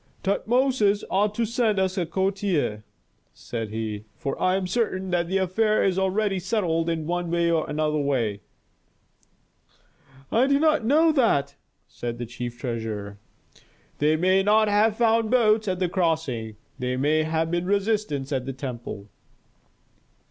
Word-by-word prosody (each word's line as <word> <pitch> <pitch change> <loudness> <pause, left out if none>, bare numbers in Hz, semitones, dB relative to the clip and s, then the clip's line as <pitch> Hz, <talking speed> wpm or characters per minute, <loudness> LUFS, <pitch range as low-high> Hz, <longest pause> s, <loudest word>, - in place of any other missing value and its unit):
"Tutmosis 215 0 +1
ought 205 +2 +1
to 235 - +1
send 230 -2 0
us 190 -1 +1
a 180 -4 -1
courier," 190 - -1 0.5
said 115 -3 -6
he. 110 -1 -4
"For 135 - -3
I 185 0 +3
am 190 -1 -1
certain 190 -2 -1
that 175 -1 +1
the 190 +2 0
affair 210 +4 +1
is 190 -1 +1
already 195 +1 0
settled 175 -5 0
in 160 -2 -2
one 175 0 -2
or 170 -2 +1
another 150 0 0
way." 120 -8 -1 1.9
"I 245 +4 +3
do 280 0 +3
not 310 -5 +3
know 310 +7 +4
that," 145 - +1 0.3
said 120 -1 -6
the 120 - -4
chief 120 +1 -6
treasurer. 110 -4 -5 0.8
"They 150 +2 +3
may 185 +4 +3
not 215 +2 +4
have 210 +1 +2
found 225 -1 +2
boats 220 -3 +3
at 185 -1 0
the 180 0 0
crossing. 160 - -1 0.2
There 125 0 -2
may 150 +4 +2
have 160 +1 -1
been 175 +1 -1
resistance 200 -9 0
at 130 -2 -2
the 135 - -3
temple." 120 -6 -7
180 Hz, 150 wpm, -25 LUFS, 140-210 Hz, 1.9 s, know